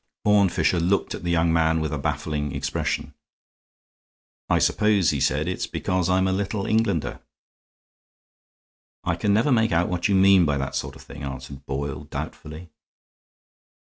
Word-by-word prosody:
Horne 105 -2 +5
Fisher 85 - +1
looked 90 +4 0
at - - -7
the 85 - -2
young 85 -1 +2
man 80 0 +2
with 80 -1 -2
a 75 - -2
baffling 75 0 -2
expression. - - -2 1.4
"I - - +4
suppose," 105 -5 +3
he 70 - -2
said, 75 +5 +1
"it's 90 - -2
because 90 -1 -1
I'm 95 +1 +2
a - - +1
Little 100 +1 -2
Englander." 105 -7 0 1.8
"I - - 0
can 105 - 0
never 115 +8 +3
make 110 -2 +3
out 85 +1 +2
what 90 -1 0
you 100 - +2
mean 95 -1 +6
by 75 -3 +1
that 70 0 -3
sort - - -4
of - - -13
thing," 70 - -11
answered 65 0 -8
Boyle, 70 0 -4
doubtfully. 80 +2 -7
85 Hz, 160 wpm, -24 LUFS, 75-95 Hz, 1.8 s, mean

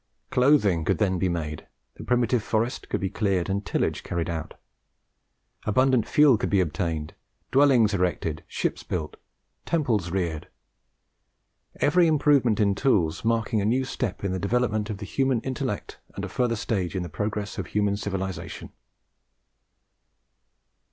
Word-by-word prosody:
Clothing 125 - +3
could - - +1
then 95 -4 +1
be 90 - +1
made, 75 -3 -4 0.3
the - - -10
primitive 125 -1 +2
forest 110 +3 -2
could - - -1
be 95 - -2
cleared 100 -4 0
and 100 +1 -1
tillage - - -1
carried 85 -1 -3
on; 80 -1 -4 1.1
abundant 130 +1 +2
fuel 145 -7 +5
could - - -1
be 100 - +3
obtained, 80 -2 -2 0.4
dwellings 130 -6 +5
erected, 90 -4 -1
ships - - -2
built, 80 -4 -4 0.5
temples 115 - 0
reared; 85 -4 -2 1.3
every 170 +4 +3
improvement 140 -7 +3
in 100 -2 +3
tools 95 - +1
marking 115 -2 +1
a - - -1
new 130 +5 +1
step 120 -7 -4
in 100 - -1
the 95 - -2
development 110 0 0
of 105 - -3
the 100 - -7
human 135 +2 +1
intellect, 130 -1 -4 0.2
and - - -4
a - - -7
further 120 -2 0
stage 100 -4 -2
in 90 - -1
the - - -5
progress 105 +5 -3
of - - -4
human 105 -1 +1
civilization. 95 -2 -5
105 Hz, 145 wpm, -26 LUFS, 90-125 Hz, 1.3 s, fuel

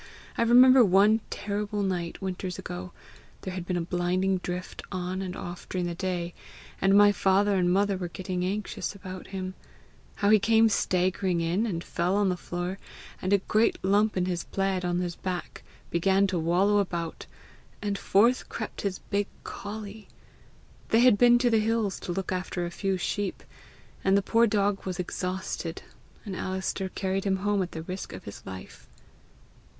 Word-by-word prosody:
I - - -1
remember 250 +2 +7
one 205 +2 +5
terrible 205 0 -2
night, 180 -2 -3
winters 185 -1 -3
ago 90 +1 -6 0.5
there 185 - -5
had 180 -1 -5
been 180 - 0
a - - 0
blinding 180 +2 0
drift 180 0 -5
on 185 0 -3
and 185 -1 -4
off 175 0 -7
during 180 -1 -1
the 175 - -2
day, 175 -1 -3 0.5
and 195 +1 +5
my 205 0 +7
father 200 +1 +3
and 180 -2 +2
mother 200 +1 +2
were 180 -1 -3
getting 180 +1 -4
anxious 200 +1 -3
about 185 -2 -8
him 185 -1 -5 0.6
how 200 0 +2
he 215 - +7
came 225 +1 +4
staggering 185 -2 +1
in, 175 +7 0
and 170 -5 -3
fell 180 +2 0
on 205 -1 +3
the 180 - 0
floor, 175 +2 -4 0.4
and 185 - -1
a 200 - +6
great 215 +3 +2
lump 205 +2 +3
in 180 - +2
his 175 -2 -2
plaid 195 -1 -1
on 175 0 0
his 175 -1 -3
back 180 -2 -5 0.3
began 190 +3 +3
to 185 -3 -1
wallow 185 +6 +3
about, 170 -4 -3 0.5
and 205 -1 -2
forth 230 +6 +3
crept 220 - -5
his 195 -2 -2
big 200 0 +1 0.2
colley! 210 +1 -7 0.8
They 225 - +4
had 250 -3 +7
been 240 +3 +6
to 240 0 +2
the 225 - +4
hills 220 -2 0
to - - -5
look 190 +1 -3
after 180 -1 -2
a 170 - -5
few 195 +1 -1
sheep, 200 +2 -2 0.6
and 195 +1 +4
the 200 - +1
poor 230 +3 +4
dog 205 -1 +1
was 185 -2 -4
exhausted, 180 -2 -4 0.4
and 195 -3 -5
Alister 190 +1 -2
carried 190 0 -2
him 195 -1 +2
home 205 -1 +2
at 180 - -4
the 160 - -5
risk 185 +3 -6
of - - -8
his 100 - -9
life." 95 -1 -9
190 Hz, 175 wpm, -27 LUFS, 180-205 Hz, 0.8 s, remember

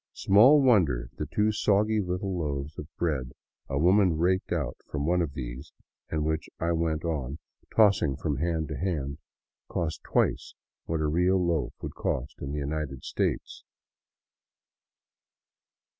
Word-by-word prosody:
Small 130 +9 +6
wonder 75 - +3
the 75 - -2
two 105 +9 +1
soggy 105 +1 +2
little 90 +1 -2
loaves 70 -1 -3
of 75 - -7
bread 65 -8 -1 0.4
a 70 - -1
woman 90 +1 +4
raked 95 +3 +1
out 70 -7 -1 0.2
of 75 - -2
one 90 +3 +2
of 75 -5 -2
these, 65 +3 -6 0.4
and 75 -1 -1
which 80 0 -2
I 85 +1 0
went 80 -1 0
on 70 -4 -2 0.4
tossing 100 -10 +4
from 70 +1 -2
hand 80 0 -1
to 75 - -4
hand, 75 -6 -2 0.5
cost 80 -3 -2
twice - - 0 0.3
what 80 -1 -1
a 75 - +1
real 90 +5 +3
loaf 85 -3 -1
would - - -4 0.5
in 70 - -5
the 75 - -3
United 70 -2 -3
States. - - -2
80 Hz, 145 wpm, -28 LUFS, 70-90 Hz, 0.5 s, Small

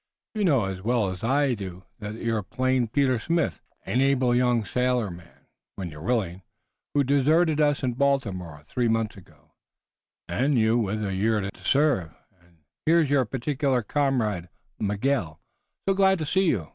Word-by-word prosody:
You 215 -2 -1
know 140 - +3
as 95 -1 -5
well 115 -1 +1
as 95 -1 -6
we 135 +2 +2
do 95 -3 -8 0.2
that 105 0 -6
you're 115 -1 -1
plain 130 +4 0
Peter 130 0 +1
Smith, 165 +6 -1 0.2
an 125 - +1
able 135 -2 +3
young 120 -3 +2
sailorman, 110 -9 -2 0.3
when 95 -3 -5
you're 75 -1 -11
willing, 95 -3 -1 0.5
who 145 - +4
deserted 150 +4 +3
us 145 -1 +2
in 125 - +1
Baltimore 100 - -1
three 120 +8 -1
months 115 -1 0
ago, 95 - -18 0.8
and 135 +2 +1
you 110 0 +3
with 110 -2 -1
a 95 - -2
year 105 +2 +1
yet 100 - -4
to - - -18
serve. 135 - +2 0.3
And 85 -3 -28 0.2
here's 160 -3 +4
your 135 -3 +3
particular 130 +1 -1
comrade, 110 - 0 0.3
Miguel, 105 - -1 0.5
so 195 - +4
glad 190 0 +4
to 155 - -3
see 190 +6 +2
you. 95 - 0
120 Hz, 165 wpm, -26 LUFS, 100-140 Hz, 0.8 s, who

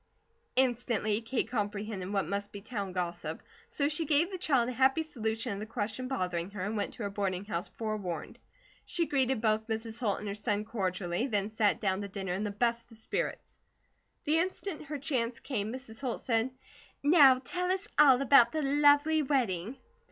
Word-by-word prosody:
Instantly 235 -4 +1
Kate 235 +2 -1
comprehended 205 -3 -3
what 195 -2 +1
must 200 +1 -3
be 205 - -7
town 200 -2 -4
gossip, 175 -3 -4 0.3
so 285 - 0
she 300 +2 0
gave 315 +5 +3
the 375 - -4
child 265 -8 +2
a - - -2
happy 265 +5 +3
solution 225 -5 -3
of 200 - -5
the 215 - -6
question 225 +3 -3
bothering 180 -8 -2
her, 200 -2 -5
and 210 +2 -2
went 205 - -2
to 235 - -6
her 200 - -1
boarding 195 -1 -2
house 180 -4 -3
forewarned. 215 -6 -4 0.4
She 340 -1 -1
greeted 265 -5 +1
both 220 0 +1
Mrs. 225 0 -4
Holt 210 -6 0
and 210 - -6
her 200 - -2
son 210 0 -1
cordially, 185 0 -2
then 205 -4 0
sat 215 -2 +2
down 190 -2 0
to 200 - -4
dinner, 195 -2 -4
in 195 +3 -2
the 210 - -1
best 235 +3 -1
of 225 - -11
spirits. 420 - -4 0.6
The 310 +2 +2
instant 365 -2 -3
her 295 +1 -4
chance 255 -5 -1
came, 220 -6 -3
Mrs. 255 -2 -8
Holt 250 -4 -3
said: 230 0 +1 0.5
"Now 285 -4 +7
tell 360 +8 -3
us 380 +2 -1
all 270 -4 +8
about 245 -3 +7
the 310 -1 0
lovely 290 +2 +4
wedding." 245 - 0
225 Hz, 190 wpm, -31 LUFS, 205-270 Hz, 0.6 s, all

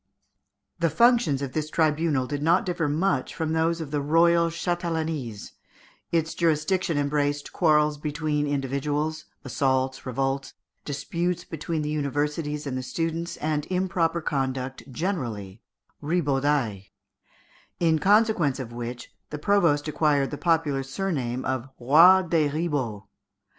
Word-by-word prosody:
The 170 -1 +2
functions 230 - +3
of 130 -2 -5
this 155 -1 -2
tribunal 155 -4 +1
did 145 +2 -4
not 170 +6 +3
differ 175 -4 -1
much 150 -3 0
from 160 -1 -2
those 165 +1 +1
of 155 -3 -6
the 145 -1 0
royal 170 +3 +4
châtellenies: 165 - -3 0.6
its 165 -1 0
jurisdiction 165 +1 +1
embraced 145 0 -1
quarrels 150 -3 +3
between 150 0 -1
individuals, 145 +3 -2 0.2
assaults, 130 +1 0
revolts, 135 +1 -2 0.3
disputes 170 +5 -2
between 160 0 -4
the 150 - -2
universities 150 +1 -2
and 135 -2 -3
the 130 - -2
students, 165 +5 -3
and 150 -1 -2
improper 175 -2 0
conduct 135 -2 -3
generally 120 - -4 0.4
(ribaudailles), 145 - 0 0.9
in 160 -2 +3
consequence 200 - +3
of 120 -3 -6
which 120 0 -6 0.2
the 150 - -5
provost 160 -4 +2
acquired 145 -3 +1
the - - -3
popular 160 -5 +1
surname 135 -4 -3
of 130 0 -2
Roi 165 +9 +7
des 165 -4 +1
Ribauds. 140 -9 -2
150 Hz, 125 wpm, -25 LUFS, 135-165 Hz, 0.9 s, Roi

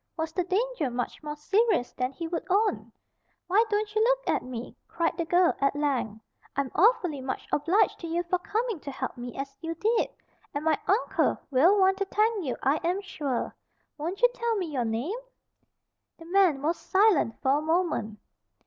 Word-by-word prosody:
Was 320 0 -2
the 360 - 0
danger 400 - 0
much 245 0 -4
more 300 -1 -5
serious 390 - +1
than 255 +1 -2
he 330 +5 -5
would 335 +1 -3
own? 415 +3 +1 0.5
"Why 400 +5 +4
don't 420 0 -1
you 435 - +2
look - - +2
at - - -1
me?" 245 -1 -7
cried 330 -1 -1
the 335 0 -2
girl, 350 +1 +4
at 275 +1 +2
length. 265 -7 -1 0.4
"I'm 275 -1 -1
awfully 360 - +3
much 260 0 -4
obliged 360 +9 +2
to 335 - -6
you 340 +2 -1
for 355 +1 0
coming 440 +1 -2
to 285 - -7
help 265 - -4
me 245 -1 -7
as 275 0 -5
you 330 0 -4
did. 445 +7 +1 0.5
And 290 +2 -3
my 315 -2 +2
uncle 410 +6 +2
will 330 +10 +5
want 385 0 +4
to 395 - +1
thank 425 0 +1
you 260 -5 -3
I 275 +3 +3
am 350 +4 -1
sure. 290 -10 -3 0.4
Won't 350 +9 -4
you - - +8
tell 470 -2 -1
me 375 - -1
your 250 -3 0
name?" 245 - -2 1.0
The 330 - -13
man 350 -6 +3
was 330 +3 +1
silent 380 - +3
for 270 +2 +2
a - - -5
moment. 320 - 0
335 Hz, 190 wpm, -27 LUFS, 280-400 Hz, 1.0 s, you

